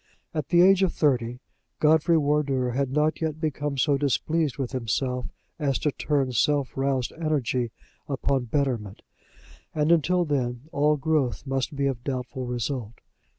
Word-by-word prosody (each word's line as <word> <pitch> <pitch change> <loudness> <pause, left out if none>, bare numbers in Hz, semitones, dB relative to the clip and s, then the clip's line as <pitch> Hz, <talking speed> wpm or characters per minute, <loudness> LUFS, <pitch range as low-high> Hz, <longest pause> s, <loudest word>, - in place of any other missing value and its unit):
At 155 -3 -2
the 175 +2 +5
age 195 0 +6
of 190 -3 +3
thirty, 125 -4 0 0.4
Godfrey 160 +2 +4
Wardour 140 -4 +1
had 135 +2 0
not 150 +3 +1
yet 160 -1 -2
become 145 -2 -2
so 140 +2 +2
displeased 145 +3 0
with 135 -3 -3
himself 125 +1 -1 0.3
as 140 -4 +1
to 150 - 0
turn 140 -2 0
self 140 +3 +1
roused 135 -2 0
energy 135 -7 0 0.4
upon 135 -1 0
betterment; 120 -6 -2 0.7
and 150 +1 +2
until 175 +2 +3
then 125 -5 -1
all 150 +1 +2
growth 140 - 0
must 135 +1 -2
be 140 0 0
of 130 -3 -2
doubtful 130 -1 -4
result. 120 -1 -3
140 Hz, 150 wpm, -26 LUFS, 125-150 Hz, 0.7 s, age